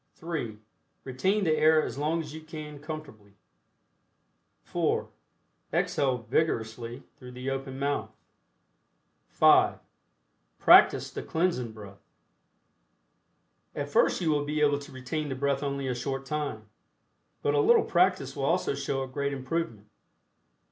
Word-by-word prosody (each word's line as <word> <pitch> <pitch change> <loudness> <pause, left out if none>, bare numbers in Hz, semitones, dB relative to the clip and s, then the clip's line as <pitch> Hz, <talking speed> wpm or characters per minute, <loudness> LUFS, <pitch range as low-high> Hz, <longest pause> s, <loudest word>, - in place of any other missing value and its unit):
(3) 160 - -4 0.5
Retain 190 +11 0
the 160 -3 +3
air 155 0 +5
as - - -4
long 155 +4 0
as 150 -2 -9
you 160 - -8
can 155 -2 -8
comfortably. 140 -10 -9 1.3
(4) - - -1 0.6
Exhale 130 -4 0
vigorously 115 -1 -1
through 125 -1 -11
the 125 +2 -4
open 135 0 -4
mouth. 140 +1 -1 1.2
(5) - - +5 0.8
Practice - - +6
the - - -5
Cleansing 160 -9 -1
Breath. 100 -2 -12 1.7
At - - -3
first - - +3
you 165 -3 +2
will 145 -1 +1
be 150 +1 -2
able 145 -1 +3
to 145 +1 -11
retain 135 +4 -4
the 135 - -3
breath 140 +1 0
only 140 -1 -2
a 130 - 0
short 135 +2 -4
time, 140 -7 -4 0.8
but 145 - +2
a 145 - +3
little 235 +11 +5
practice 175 -7 +2
will 135 - -2
also 170 0 +1
show 135 -1 -2
a - - -6
great 140 +2 -2
improvement. 130 -5 -3
140 Hz, 135 wpm, -28 LUFS, 130-155 Hz, 1.7 s, Practice